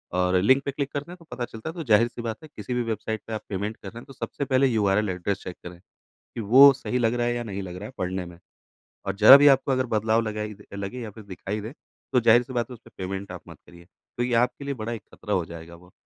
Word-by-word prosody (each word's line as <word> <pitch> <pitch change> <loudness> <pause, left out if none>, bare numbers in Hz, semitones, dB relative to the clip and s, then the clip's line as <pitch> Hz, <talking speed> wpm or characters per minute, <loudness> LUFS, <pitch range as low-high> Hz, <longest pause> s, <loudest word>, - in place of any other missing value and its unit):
और 90 0 +2
लिंक 130 +7 +4
पे 140 - -1
क्लिक 140 0 -3
करते 145 +4 -4
हैं 180 - -10
तो 170 - -18
पता 120 - -3
चलता 110 +5 -8
है। - - -6
तो 170 - -5
ज़ाहिर-सी 120 -1 +2
बात 115 +3 -5
है 155 - -12
किसी 105 +4 -5
भी 125 0 0
वेबसाइट 110 -1 -3
पे 115 - -5
आप 110 - -3
पेमेंट 105 +2 -3
कर - - -11
रहे 115 - -10
हैं 120 - -13
तो 135 - -13
सबसे 140 +2 -4
पहले 135 0 +3
यूआरएल 105 -3 +1
एड्रेस 95 +2 -3
चेक 90 - -7
करें। 90 0 -10 0.6
कि - - -2
वो 130 +7 +8
सही 125 -1 -3
लग 115 -1 +1
रहा 120 0 0
है 120 - 0
या 120 - -2
नहीं 100 -3 -5
लग 90 -1 -7
रहा 100 +3 -7
है 125 - -11
पढ़ने 90 0 -2
में। 85 -1 -12 0.7
और 100 - -2
ज़रा 110 +6 +10
भी 145 +1 +5
आपको 135 0 +4
अगर 130 -1 +1
बदलाव 110 +1 +2
लगा 105 -1 -3 0.3
लगे 100 +5 -5
या 110 -3 -6
फिर 110 +2 -12
दिखाई 100 +2 -5
दे 110 +5 -7 0.4
तो 125 - +5
ज़ाहिर-सी 120 +3 +4
बात 120 0 -1
है - - -8
उस 120 - -12
पे - - -14
पेमेंट 95 +1 -5
आप - - -8
मत - - -12
करिए 85 0 -16
क्योंकि 120 +6 -5
आपके 125 +3 -2
लिए 140 - -2
बड़ा 110 +2 -3
एक 110 -4 -7
खतरा 105 - -4
हो 90 -4 +1
जाएगा 85 0 -10
वो। 90 +1 -18
110 Hz, 275 wpm, -25 LUFS, 100-125 Hz, 0.7 s, ज़रा